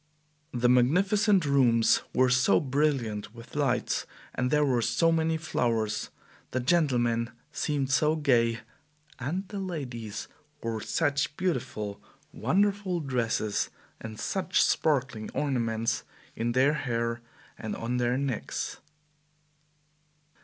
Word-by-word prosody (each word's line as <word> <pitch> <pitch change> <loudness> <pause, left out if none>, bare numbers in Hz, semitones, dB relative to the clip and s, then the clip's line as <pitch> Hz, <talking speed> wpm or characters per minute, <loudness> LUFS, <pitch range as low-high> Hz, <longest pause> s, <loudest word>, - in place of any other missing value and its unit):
The 120 0 +1
magnificent 185 - +4
rooms 125 -5 +4
were 130 0 +3
so 130 0 +4
brilliant 130 -8 -1
with 115 +3 -12
lights, 135 -4 0 0.3
there 150 +4 +2
were 125 -4 +2
so 120 +9 +2
many 160 0 +1
flowers, 115 -9 -1 0.4
the 130 - -1
gentlemen 120 -6 +2 0.2
seemed 140 -3 -1
so 150 +3 +3
gay, 115 -7 +2 0.6
and 175 +10 -3
the 205 - -5
ladies 125 - -5 0.4
wore 115 -1 -2
such 145 0 0
beautiful, 115 - -2 0.3
wonderful 195 - +1
dresses, 120 -7 -1 0.3
and 110 -1 -8
such 190 0 +1
sparkling 130 -8 +1
ornaments 115 -5 0 0.3
in 120 +1 -1
their 135 +4 +4
hair 115 -4 -2 0.3
and 110 - -5
on 120 +2 -2
their 120 +1 +1
necks. 135 -4 -3
130 Hz, 110 wpm, -28 LUFS, 115-150 Hz, 0.6 s, magnificent